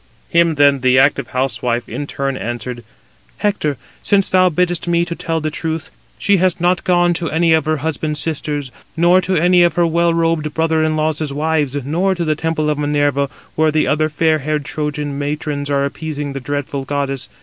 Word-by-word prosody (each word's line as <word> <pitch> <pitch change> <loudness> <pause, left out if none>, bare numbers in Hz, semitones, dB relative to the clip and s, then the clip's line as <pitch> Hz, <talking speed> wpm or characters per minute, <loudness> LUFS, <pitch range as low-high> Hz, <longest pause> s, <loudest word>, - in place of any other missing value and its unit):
Him 170 -1 +3
then 140 -1 +4
the 130 0 +3
active 130 - +3
housewife 125 -2 -1
in 145 - -5
turn 135 -1 -2
addressed: 120 0 -5 0.6
"Hector, 195 -9 -1 0.2
since 200 -2 +2
thou 185 0 +5
biddest 175 +1 0
me 170 0 +2
to 175 - -4
tell 165 -1 -2
the 155 0 -3
truth, 160 0 -4 0.3
she 200 -1 +2
has 185 -1 +1
not 175 +1 +1
gone 175 -1 +3
to 170 -1 -2
any 165 +1 +2
of 160 -2 +2
her 155 0 +1
husband's 155 -1 -2
sisters, 150 -3 -3 0.3
nor 175 +2 +5
to 185 +1 -1
any 175 +2 +4
of 175 -1 +3
her 175 - +3
well 170 +1 +2
robed 165 -2 0
brother 160 -1 +1
in 155 0 +1
laws' 155 -1 -1
wives, 150 -1 0
nor 180 +6 +1
to 170 -1 -2
the 155 -1 +1
temple 160 -1 -1
of 150 - -2
Minerva, 145 -1 +1 0.2
where 155 0 +2
the 155 0 +2
other 155 +1 +1
fair 155 +1 +1
haired 150 +1 -2
Trojan 150 -2 -3
matrons 145 0 -3
are 140 -1 +1
appeasing 145 -1 -4
the 135 - -4
dreadful 140 +1 -3
goddess. 135 -1 -3
155 Hz, 195 wpm, -18 LUFS, 145-170 Hz, 0.6 s, thou